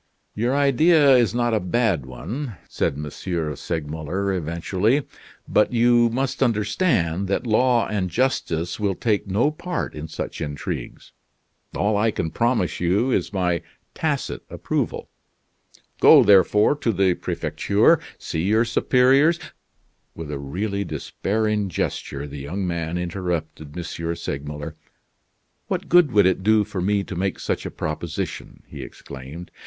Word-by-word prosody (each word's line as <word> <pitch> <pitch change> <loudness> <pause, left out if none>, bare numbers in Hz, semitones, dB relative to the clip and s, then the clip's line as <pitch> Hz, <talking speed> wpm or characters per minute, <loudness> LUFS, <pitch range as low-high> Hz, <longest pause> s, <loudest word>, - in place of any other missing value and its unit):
"Your 120 +5 0
idea 145 +1 +5
is 120 -2 +3
not 120 -1 +1
a 110 - +3
bad 90 - 0
one," 115 - -6
said - - -1
M. 75 +1 -5 0.5
Segmuller, 80 +6 -3
eventually. 95 - 0 0.4
"But 105 +4 +2
you 120 0 +4
must 130 +3 -2
understand 105 - +1
that 100 - -1
law 120 +1 +3
and 100 -4 -1
justice 90 -6 -1
will 100 -3 0
take 105 -1 0
no 110 +10 +2
part 175 +2 -4
in 75 +1 -6
such 80 - -6
intrigues. 75 -2 -5 0.7
All 105 +1 +1
I 110 +2 +3
can 80 -6 -2
promise 115 -6 0
you 100 +9 +1
is - - 0
my 90 -4 0 0.3
tacit - - -2
approval. - - -3 0.9
Go, - - +8
therefore, 105 +6 +5
to 120 - 0
the 95 -2 +2
Prefecture; - - +1 0.2
see 80 - -3
your 110 +6 +3
superiors 130 +7 +4 0.4
" - - -44
With 80 -2 -6
a 70 - -4
really 100 +9 -3
despairing 105 +6 -1
gesture, 70 -4 -3
the 70 0 -8
young 90 +8 -4
man 85 -1 -2
interrupted 85 -4 -4
M. 90 - -3 0.3
Segmuller. 75 +1 -5 0.9
"What - - -3
good 175 -5 +5
would 105 -4 +5
it 95 0 +2
do 110 +2 +4
for 100 -3 -5
me 100 +2 +1
to 95 - -7
make 95 +2 -1
such - - -2
a - - -4
proposition?" 75 0 -5
he - - -9
exclaimed. 70 +6 -10
100 Hz, 140 wpm, -23 LUFS, 85-120 Hz, 0.9 s, Go